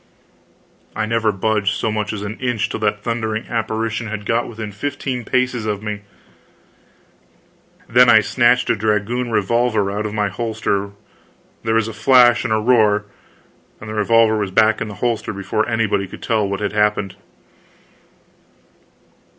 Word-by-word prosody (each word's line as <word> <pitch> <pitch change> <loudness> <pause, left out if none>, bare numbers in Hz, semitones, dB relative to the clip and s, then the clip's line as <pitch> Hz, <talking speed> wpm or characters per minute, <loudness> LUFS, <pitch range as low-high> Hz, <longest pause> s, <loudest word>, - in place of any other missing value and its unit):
I 110 - -1
never 115 -1 +1
budged 100 0 0
so 110 - -1
much 105 -1 -2
as 105 -2 -5
an 105 +2 -6
inch 125 -5 -1
till - - -4
that 105 -1 -1
thundering 110 -2 -2
apparition 110 0 -2
had 105 -1 -6
got 115 +2 0
within 110 -2 -7
fifteen 130 +2 -4
paces 125 -1 -1
of 105 -1 -3
me; 105 -1 -4 1.9
then 125 +1 +5
I 110 - +7
snatched 125 +2 +2
a - - +2
dragoon 110 +4 -1
revolver 110 -1 +1
out 105 +2 -2
of 105 - -7
my 105 -1 +1
holster, 105 -1 -2 0.7
there 110 0 0
was 115 -1 +2
a 110 - -6
flash 120 +2 +5
and 120 - -3
a 110 - +3
roar, 105 -2 +3 0.7
and 110 - -10
the 110 - -5
revolver 110 +1 +3
was 100 -2 -2
back 110 +3 +3
in - - -2
the 105 - -8
holster 115 -2 -1
before 100 +2 -2
anybody 105 -3 0
could - - -11
tell 110 -3 0
what 100 +1 -3
had 105 0 -2
happened. 105 -2 0
110 Hz, 160 wpm, -19 LUFS, 105-115 Hz, 1.9 s, I